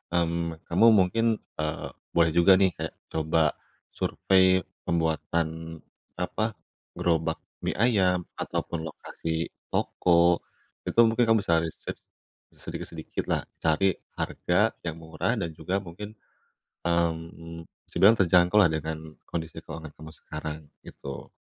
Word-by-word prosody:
mmm, 85 Hz, -1 st, -1 dB
kamu 90 Hz, +7 st, +3 dB
mungkin, 110 Hz, +4 st, +3 dB, 0.2 s
eee, 75 Hz, -1 st, -2 dB, 0.3 s
boleh 85 Hz, -1 st, +5 dB
juga 85 Hz, +3 st, +6 dB
nih 95 Hz, -1 st, +4 dB
kayak 80 Hz, 0 st, -5 dB, 0.2 s
coba 80 Hz, -1 st, +2 dB, 0.4 s
survei 95 Hz, -1 st, +3 dB, 0.2 s
pembuatan, 80 Hz, 0 st, -1 dB, 0.4 s
apa, 110 Hz, +5 st, -2 dB, 0.4 s
gerobak 80 Hz, -1 st, 0 dB, 0.3 s
mie -, -, 0 dB
ayam, 95 Hz, -6 st, +3 dB, 0.2 s
ataupun 85 Hz, -, -2 dB
lokasi 80 Hz, +1 st, -4 dB, 0.2 s
toko, 85 Hz, 0 st, +3 dB, 0.5 s
itu -, -, 0 dB
mungkin 115 Hz, +1 st, +3 dB
kamu 115 Hz, 0 st, +5 dB
bisa 85 Hz, -1 st, +3 dB
research 80 Hz, -1 st, -5 dB, 0.5 s
sedikit-sedikitlah, 80 Hz, -2 st, -4 dB, 0.2 s
cari 80 Hz, +5 st, +3 dB, 0.2 s
harga -, -, +1 dB, 0.2 s
yang 80 Hz, -, -2 dB
murah 80 Hz, -, -1 dB
dan 85 Hz, -, -2 dB
juga 95 Hz, +5 st, -2 dB
mungkin, 105 Hz, +5 st, -8 dB, 0.7 s
mmm, 85 Hz, -1 st, -2 dB, 0.2 s
bisa -, -, -16 dB
dibilang 105 Hz, +4 st, +8 dB
terjangkau 90 Hz, 0 st, +4 dB
lah 90 Hz, -6 st, +6 dB
dengan 80 Hz, 0 st, -5 dB
kondisi 80 Hz, -2 st, -5 dB
keuangan 80 Hz, -2 st, -8 dB
kamu 80 Hz, 0 st, -9 dB
sekarang, 75 Hz, 0 st, -6 dB, 0.3 s
gitu. 70 Hz, 0 st, -8 dB
85 Hz, 115 wpm, -27 LUFS, 80-95 Hz, 0.7 s, dibilang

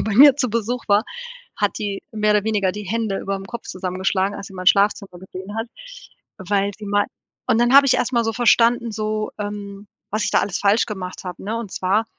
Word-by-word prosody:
äh, -, -, 0 dB
bei 215 Hz, -2 st, -2 dB
mir 275 Hz, +2 st, +9 dB
zu 255 Hz, -4 st, 0 dB
Besuch 230 Hz, +2 st, -2 dB
war, 205 Hz, +3 st, +4 dB, 0.5 s
hat 205 Hz, -1 st, 0 dB
die 205 Hz, -2 st, -3 dB
mehr 215 Hz, -1 st, 0 dB
oder 210 Hz, 0 st, +2 dB
weniger 205 Hz, -4 st, +1 dB
die 210 Hz, 0 st, -7 dB
Hände 215 Hz, -1 st, -2 dB
überm 195 Hz, 0 st, -4 dB
Kopf 235 Hz, -1 st, -8 dB
zusammengeschlagen, 190 Hz, +2 st, -1 dB
als 200 Hz, -, -7 dB
sie 195 Hz, -, -14 dB
mein 185 Hz, 0 st, -7 dB
Schlafzimmer 200 Hz, -2 st, +3 dB
gesehen 190 Hz, +2 st, -9 dB
hat, 225 Hz, +1 st, -2 dB, 0.7 s
weil 200 Hz, +1 st, 0 dB
sie 210 Hz, -, -8 dB
mei 205 Hz, 0 st, +2 dB, 0.4 s
und 230 Hz, -2 st, +3 dB
dann 240 Hz, +2 st, +3 dB
habe 280 Hz, 0 st, +8 dB
ich 255 Hz, -, +4 dB
erst 250 Hz, -, 0 dB
mal 235 Hz, -1 st, +2 dB
so 225 Hz, -, 0 dB
verstanden, 235 Hz, 0 st, +3 dB
so, 215 Hz, 0 st, -2 dB
ähm, 205 Hz, -1 st, -6 dB, 0.2 s
was 215 Hz, +1 st, -1 dB
ich -, -, 0 dB
da -, -, +4 dB
alles 195 Hz, -, -2 dB
falsch 205 Hz, +3 st, +3 dB
gemacht 190 Hz, -4 st, -6 dB
habe, 180 Hz, -1 st, -7 dB
ne? 220 Hz, +3 st, -2 dB
Und 230 Hz, -4 st, -5 dB
zwar 200 Hz, +4 st, +1 dB
205 Hz, 220 wpm, -21 LUFS, 195-225 Hz, 0.7 s, mir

